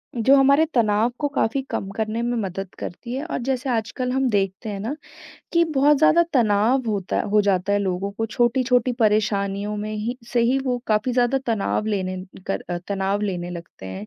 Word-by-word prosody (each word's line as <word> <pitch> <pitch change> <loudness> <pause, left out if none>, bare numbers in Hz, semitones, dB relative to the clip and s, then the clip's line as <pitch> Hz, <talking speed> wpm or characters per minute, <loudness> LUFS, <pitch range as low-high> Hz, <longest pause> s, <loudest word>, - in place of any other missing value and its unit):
जो 245 +4 +5
हमारे 280 +3 +5
तनाव 220 0 +3
को 290 - +1
काफ़ी 275 -2 0
कम 195 - -3
करने 220 +1 -1
में 240 0 -1
मदद 195 0 -5
करती 235 +7 -6
है 275 +4 -3
और 340 - -3
जैसे 260 0 -1
आजकल 240 +3 -2
हम 265 0 +1
देखते 195 0 -1
हैं 200 -1 -4
ना 230 +8 -3 0.6
कि 340 -1 +4
बहुत 285 +2 +5
ज़्यादा 315 +3 +5
तनाव 230 +2 +3
होता 195 -3 -2
है - - -1
हो 210 - +5
जाता 195 -1 +1
है 205 - +3
लोगों 190 0 -2
को 225 +2 -2
छोटी-छोटी 245 +2 +2
परेशानियों 205 -1 +1
में 210 +1 -4
ही 230 +4 -3 0.2
से 240 - +3
ही 250 +3 +2
वो 250 -2 0
काफ़ी 215 +4 +1
ज़्यादा 245 +2 +2
तनाव 215 -1 0
लेने 190 -3 -1 0.3
कर 195 - -1
अ, 175 - -1
तनाव 200 +1 0
लेने 180 -4 -3
लगते 170 - -9
हैं। 95 +3 -7
220 Hz, 195 wpm, -23 LUFS, 200-250 Hz, 0.6 s, जो